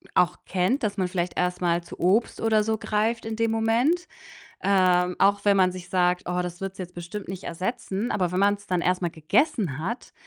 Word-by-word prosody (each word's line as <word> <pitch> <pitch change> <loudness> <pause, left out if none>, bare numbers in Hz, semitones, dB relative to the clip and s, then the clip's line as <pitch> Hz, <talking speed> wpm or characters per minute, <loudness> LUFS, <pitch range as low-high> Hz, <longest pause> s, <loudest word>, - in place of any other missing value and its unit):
auch 180 0 +3
kennt, 195 +9 0
dass 205 -2 0
man 185 -1 +1
vielleicht 175 -1 -2
erst 180 0 0
mal 170 0 +1
zu - - -11
Obst 200 +7 +2
oder 220 -1 +3
so 220 0 0
greift 220 +2 -1
in 225 0 -3
dem 230 0 +1
Moment. 235 +11 +1 0.6
Ähm, 180 -2 +3
auch 200 +1 +3
wenn 200 -1 +5
man 185 -1 +4
sich 180 -1 -9
sagt: 180 -1 +2
„Oh, 180 0 0
das 175 0 -6
wird's 195 0 -5
jetzt 180 -1 -6
bestimmt 175 +3 -7
nicht 190 -1 -6
ersetzen.“ 195 +4 -3
Aber 180 -4 0
wenn 180 - 0
man's 205 0 +1
dann 180 -2 0
erst 180 +1 +1
mal 175 - 0
gegessen 160 - 0
hat, 230 +10 -4
190 Hz, 210 wpm, -25 LUFS, 180-220 Hz, 0.6 s, wenn